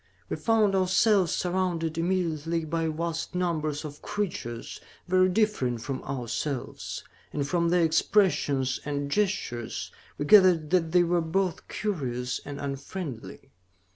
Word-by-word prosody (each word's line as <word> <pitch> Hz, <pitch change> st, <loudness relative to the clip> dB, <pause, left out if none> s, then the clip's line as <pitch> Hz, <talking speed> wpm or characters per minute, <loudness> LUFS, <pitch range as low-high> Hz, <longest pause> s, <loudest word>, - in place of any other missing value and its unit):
We -, -, -1 dB
found 220 Hz, -3 st, +2 dB
ourselves 190 Hz, 0 st, +3 dB
surrounded 175 Hz, -3 st, -1 dB
immediately 165 Hz, -2 st, 0 dB
by 165 Hz, +1 st, -1 dB
vast 165 Hz, +2 st, -3 dB
numbers 155 Hz, -4 st, -1 dB
of 145 Hz, -1 st, -8 dB
creatures 145 Hz, -, -4 dB, 0.3 s
very 185 Hz, 0 st, +4 dB
different 180 Hz, -, +1 dB
from 130 Hz, +1 st, -3 dB
ourselves, 130 Hz, +1 st, -4 dB, 0.3 s
and 140 Hz, -1 st, -2 dB
from 170 Hz, +2 st, +1 dB
their 175 Hz, 0 st, +3 dB
expressions 160 Hz, -6 st, +2 dB
and 145 Hz, -1 st, -3 dB
gestures, 185 Hz, -, -1 dB, 0.3 s
we 145 Hz, -, -2 dB
gathered 180 Hz, -4 st, +6 dB
that 170 Hz, -3 st, +2 dB
they 175 Hz, 0 st, +5 dB
were 175 Hz, 0 st, +2 dB
both 180 Hz, +2 st, -1 dB
curious 125 Hz, -, -2 dB
and 140 Hz, 0 st, -6 dB
unfriendly. 140 Hz, -, -6 dB
165 Hz, 125 wpm, -27 LUFS, 145-185 Hz, 0.3 s, gathered